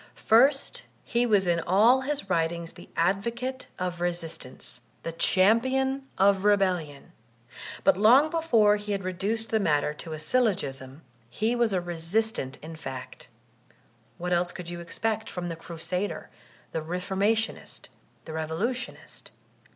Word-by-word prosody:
First 270 Hz, +5 st, +4 dB, 0.2 s
he 240 Hz, 0 st, +1 dB
was 205 Hz, -4 st, +3 dB
in 170 Hz, -1 st, +2 dB
all 215 Hz, +10 st, +4 dB
his 280 Hz, -1 st, -2 dB
writmgs 170 Hz, -2 st, -1 dB
the -, -, -14 dB
advocate 235 Hz, +9 st, -1 dB
of 180 Hz, -1 st, -3 dB
resistance, 165 Hz, -7 st, -5 dB, 0.2 s
the 165 Hz, -, -3 dB
champion 260 Hz, +10 st, +2 dB
of 195 Hz, 0 st, +4 dB
rebellion. 185 Hz, -8 st, +1 dB, 0.7 s
But -, -, +4 dB
long 255 Hz, +9 st, +6 dB
before 230 Hz, -11 st, +4 dB
he 205 Hz, 0 st, -4 dB
had 195 Hz, -1 st, -2 dB
reduced 205 Hz, +5 st, -2 dB
the 220 Hz, -, +3 dB
matter 150 Hz, -5 st, +1 dB
to 160 Hz, +1 st, -8 dB
a -, -, -4 dB
syllogism, 155 Hz, -, -1 dB, 0.3 s
he 220 Hz, -, 0 dB
was 235 Hz, -2 st, +2 dB
a 190 Hz, -, +1 dB
resistant 175 Hz, -3 st, -2 dB
in 160 Hz, +1 st, -8 dB
fact. 130 Hz, -6 st, -8 dB, 0.9 s
What 180 Hz, +1 st, -2 dB
else 175 Hz, 0 st, +1 dB
could 175 Hz, -1 st, -7 dB
you 175 Hz, -, -6 dB
expect 220 Hz, +6 st, -2 dB
from 175 Hz, -1 st, -4 dB
the 165 Hz, -, -4 dB
Crusader, 175 Hz, +4 st, -4 dB, 0.4 s
the 160 Hz, -, -2 dB
Re 170 Hz, +4 st, -3 dB
formationist, 205 Hz, +4 st, -1 dB, 0.4 s
the 160 Hz, -, -7 dB
Revolutionist? 165 Hz, +12 st, -4 dB
190 Hz, 135 wpm, -27 LUFS, 165-225 Hz, 0.9 s, long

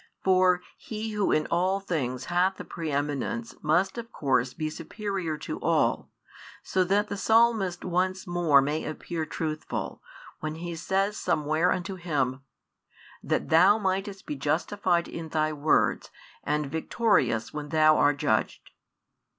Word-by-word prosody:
For 185 Hz, -1 st, +4 dB, 0.2 s
He 220 Hz, 0 st, -5 dB
Who 210 Hz, -2 st, 0 dB
in 155 Hz, -, +2 dB
all 185 Hz, +3 st, +2 dB
things 135 Hz, -10 st, -3 dB
hath 180 Hz, +2 st, +1 dB
the -, -, -6 dB
pre 165 Hz, -2 st, -5 dB
eminence 150 Hz, -, -2 dB
must 170 Hz, +9 st, +1 dB
of 230 Hz, 0 st, -8 dB
course 130 Hz, -3 st, 0 dB
be 155 Hz, -1 st, -2 dB
superior 170 Hz, 0 st, -4 dB
to -, -, -6 dB
all, -, -, +1 dB, 0.5 s
so 185 Hz, -, +1 dB
that 205 Hz, +3 st, +2 dB
the 205 Hz, -, -4 dB
Psalmist 220 Hz, -5 st, +2 dB
once 185 Hz, +1 st, 0 dB
more 170 Hz, -6 st, +4 dB
may 150 Hz, +3 st, -1 dB
appear 160 Hz, +1 st, -4 dB
truthful, 155 Hz, -1 st, -4 dB, 0.4 s
when 155 Hz, 0 st, -4 dB
he 170 Hz, +1 st, -5 dB
says 195 Hz, +5 st, 0 dB
somewhere 155 Hz, +4 st, +1 dB
unto 185 Hz, +1 st, -3 dB
Him: 140 Hz, -7 st, -1 dB, 0.8 s
That -, -, -1 dB
Thou 185 Hz, +6 st, +6 dB
mightest 195 Hz, -1 st, -2 dB
be 150 Hz, -, -4 dB
justified 170 Hz, +5 st, 0 dB
in 165 Hz, -1 st, -7 dB
Thy 155 Hz, 0 st, 0 dB
words 150 Hz, +1 st, +1 dB, 0.3 s
and 150 Hz, 0 st, 0 dB
victorious 145 Hz, -, 0 dB
when 150 Hz, -1 st, -5 dB
Thou 155 Hz, -1 st, +5 dB
art 145 Hz, -1 st, +3 dB
judged. -, -, -1 dB
170 Hz, 140 wpm, -27 LUFS, 155-190 Hz, 0.8 s, Thou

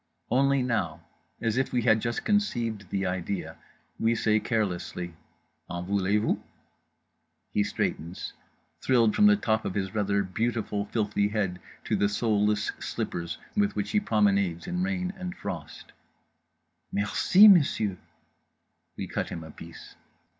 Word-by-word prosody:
Only 135 Hz, +1 st, +3 dB
now, 105 Hz, -11 st, -1 dB, 0.4 s
as 115 Hz, 0 st, +1 dB
if 130 Hz, -, 0 dB
we 120 Hz, -2 st, +1 dB
had 110 Hz, -2 st, +4 dB
just 120 Hz, 0 st, -2 dB
conceived 120 Hz, -, 0 dB
the 95 Hz, -1 st, -1 dB
idea, 90 Hz, +1 st, -3 dB, 0.4 s
we 115 Hz, +1 st, +2 dB
say 110 Hz, -1 st, +2 dB
carelessly 90 Hz, -6 st, -2 dB, 0.6 s
"en 85 Hz, 0 st, -4 dB
voulez 100 Hz, +1 st, +1 dB
vous?" 105 Hz, -, 0 dB, 1.1 s
He 105 Hz, -, +2 dB
straightens, 85 Hz, -3 st, -3 dB, 0.5 s
thrilled 115 Hz, -4 st, +3 dB
from 210 Hz, -, +6 dB
the 210 Hz, -, +7 dB
top 110 Hz, -, 0 dB
of 90 Hz, -, -4 dB
his 95 Hz, -2 st, -2 dB
rather 100 Hz, -2 st, +1 dB
beautiful 105 Hz, +1 st, -2 dB
filthy 105 Hz, -2 st, 0 dB
head 100 Hz, -4 st, -1 dB, 0.2 s
to -, -, 0 dB
the 100 Hz, -, +2 dB
soleless 105 Hz, -1 st, +1 dB
slippers 85 Hz, -1 st, -4 dB, 0.2 s
with 205 Hz, 0 st, +1 dB
which -, -, -2 dB
he 210 Hz, -, +3 dB
promenades 100 Hz, -, +1 dB
in 180 Hz, 0 st, -2 dB
rain 185 Hz, -1 st, -1 dB
and 180 Hz, -1 st, -6 dB
frost: -, -, -7 dB, 1.0 s
"Merci, 180 Hz, -, +5 dB
Monsieur!" 140 Hz, -, +5 dB, 1.0 s
We -, -, -3 dB
cut -, -, -3 dB
him 85 Hz, -, -6 dB
a 80 Hz, -, -10 dB
piece. 80 Hz, +2 st, -12 dB
105 Hz, 140 wpm, -27 LUFS, 100-125 Hz, 1.1 s, the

